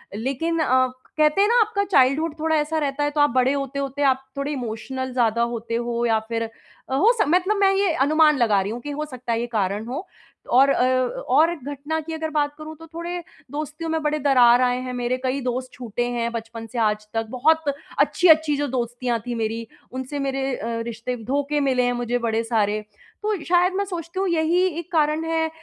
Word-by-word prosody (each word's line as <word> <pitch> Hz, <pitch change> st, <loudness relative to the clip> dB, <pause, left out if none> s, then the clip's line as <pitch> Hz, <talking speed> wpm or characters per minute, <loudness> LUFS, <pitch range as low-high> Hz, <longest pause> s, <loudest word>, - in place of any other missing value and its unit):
लेकिन 275 Hz, +9 st, -1 dB
अ, 255 Hz, -4 st, +3 dB, 0.3 s
कहते 305 Hz, +5 st, +4 dB
हैं 410 Hz, -, +5 dB
ना 480 Hz, +1 st, +4 dB
आपका 415 Hz, -2 st, +1 dB
चाइल्डहुड 285 Hz, +2 st, +3 dB
थोड़ा 320 Hz, +1 st, +1 dB
ऐसा 305 Hz, +1 st, 0 dB
रहता 285 Hz, -1 st, -1 dB
है 290 Hz, -, 0 dB
तो 295 Hz, 0 st, +1 dB
आप 290 Hz, -, +5 dB
बड़े 255 Hz, +1 st, +3 dB
होते-होते 275 Hz, 0 st, -3 dB
आप 265 Hz, -1 st, +2 dB
थोड़े 280 Hz, +1 st, -2 dB
इमोशनल 260 Hz, 0 st, -4 dB
ज़्यादा 235 Hz, -2 st, +2 dB
होते 230 Hz, 0 st, -4 dB
हो 235 Hz, 0 st, -1 dB
या 225 Hz, -2 st, +3 dB
फिर 230 Hz, 0 st, -1 dB
अ, 230 Hz, +3 st, -8 dB
हो 410 Hz, -, +5 dB
स -, -, +4 dB
मतलब 365 Hz, +6 st, +2 dB
मैं 395 Hz, -1 st, +4 dB
ये 390 Hz, -4 st, +2 dB
अनुमान 300 Hz, +2 st, +4 dB
लगा 215 Hz, -5 st, +3 dB
रही 195 Hz, +2 st, -3 dB
हूँ 240 Hz, +2 st, -5 dB
कि 295 Hz, -, -6 dB
हो 300 Hz, +1 st, -3 dB
सकता 255 Hz, -4 st, -6 dB
है 225 Hz, -, 0 dB
ये 240 Hz, -, -3 dB
कारण 210 Hz, -2 st, -1 dB
हो 285 Hz, +10 st, -5 dB, 0.5 s
और 270 Hz, +2 st, +6 dB
अ 275 Hz, -, +3 dB, 0.5 s
और 300 Hz, +6 st, +5 dB
एक 325 Hz, -7 st, -7 dB
घटना 290 Hz, +3 st, -3 dB
की 325 Hz, +1 st, -7 dB
अगर 320 Hz, 0 st, -3 dB
बात 290 Hz, -1 st, +1 dB
करूँ 310 Hz, 0 st, -8 dB
तो 325 Hz, -, -12 dB
थोड़े 340 Hz, +1 st, -4 dB, 0.3 s
दोस्तियों 305 Hz, +2 st, -5 dB
में 320 Hz, 0 st, 0 dB
बड़े 300 Hz, 0 st, 0 dB
दरार 250 Hz, -3 st, +5 dB
आए 250 Hz, 0 st, +2 dB
हैं। 255 Hz, 0 st, -5 dB
मेरे 245 Hz, +1 st, -1 dB
कई 260 Hz, +2 st, -1 dB
दोस्त 255 Hz, +1 st, -3 dB
छूटे 240 Hz, -1 st, -3 dB
हैं 235 Hz, -1 st, -1 dB
बचपन 225 Hz, 0 st, -6 dB
से 240 Hz, +1 st, -5 dB
आज 210 Hz, -1 st, +1 dB
तक। 225 Hz, 0 st, -1 dB
बहुत 315 Hz, +7 st, +2 dB, 0.4 s
अच्छी-अच्छी 315 Hz, -4 st, +4 dB
जो 290 Hz, 0 st, -1 dB
दोस्तियाँ 245 Hz, -1 st, -2 dB
थी 245 Hz, -1 st, -3 dB
मेरी 225 Hz, 0 st, -3 dB, 0.2 s
उनसे 260 Hz, +3 st, -5 dB
मेरे 270 Hz, -1 st, -1 dB
अ, 220 Hz, -, -6 dB, 0.2 s
रिश्ते 235 Hz, +2 st, -4 dB
धोखे 285 Hz, +3 st, 0 dB
मिले 265 Hz, -3 st, +2 dB
हैं 245 Hz, 0 st, +1 dB
मुझे 245 Hz, 0 st, -1 dB
बड़े 230 Hz, -1 st, 0 dB
सारे। 215 Hz, -2 st, +1 dB, 0.4 s
तो 425 Hz, -1 st, 0 dB
शायद 360 Hz, +1 st, +3 dB
मैं 400 Hz, +1 st, 0 dB
सोचती 350 Hz, -1 st, -5 dB
हूँ 390 Hz, -, +1 dB
यही 335 Hz, +2 st, +2 dB, 0.2 s
एक 345 Hz, -, -9 dB
कारण 310 Hz, 0 st, +2 dB
है 325 Hz, 0 st, 0 dB
270 Hz, 215 wpm, -23 LUFS, 240-315 Hz, 0.5 s, और